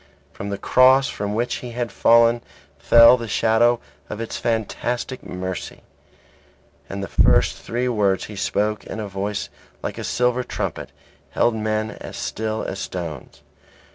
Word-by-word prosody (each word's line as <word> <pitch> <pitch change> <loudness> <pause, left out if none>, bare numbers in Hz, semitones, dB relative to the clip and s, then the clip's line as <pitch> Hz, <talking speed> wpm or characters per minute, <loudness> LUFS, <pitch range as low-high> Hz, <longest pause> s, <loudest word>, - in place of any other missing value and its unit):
From 100 - -6
the 100 - -3
Cross 130 +5 +5
from 105 0 -3
which 120 +2 -1
he 120 -1 -8
had 120 -2 -3
fallen 115 +2 +4 0.4
fell 115 +9 +7
the 115 -1 -6
shadow 115 +3 +3 0.3
of 105 - -6
its 115 - -4
fantastic 120 +3 -2
mercy; 90 0 -6 1.1
and 100 +1 -4
the - - -4
first - - +3
three 120 +2 -2
words 100 -5 +1
he 105 - -9
spoke 105 +2 -1
in - - -7
a 105 - -4
voice 100 +1 -3 0.3
like - - -4
a - - -4
silver 125 0 +1
trumpet, 70 - -4 0.4
held 120 - +2
men 110 0 -1
as - - -9
still 110 0 -3
as 95 - -5
stones. 80 -6 -6
110 Hz, 150 wpm, -22 LUFS, 100-120 Hz, 1.1 s, fell